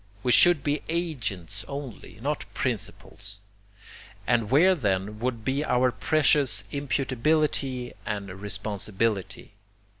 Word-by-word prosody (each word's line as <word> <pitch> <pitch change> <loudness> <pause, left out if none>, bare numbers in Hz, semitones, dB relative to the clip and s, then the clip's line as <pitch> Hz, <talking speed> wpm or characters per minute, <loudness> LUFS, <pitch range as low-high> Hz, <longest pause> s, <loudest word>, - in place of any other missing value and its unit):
We 125 - +2
should 165 +3 +7
be 145 0 0
'agents' 110 - -2
only, 140 -6 -7
not 150 +1 -1
'principals,' 105 -4 -4 0.9
and 115 -3 +1
where 165 +9 +6
then 105 - -1
would 120 -2 -2
be 135 +3 0
our 125 -3 +2
precious 145 -1 +2
imputability 135 -1 0
and 100 -2 -3
responsibility? 100 -1 -2
125 Hz, 100 wpm, -26 LUFS, 105-145 Hz, 0.9 s, should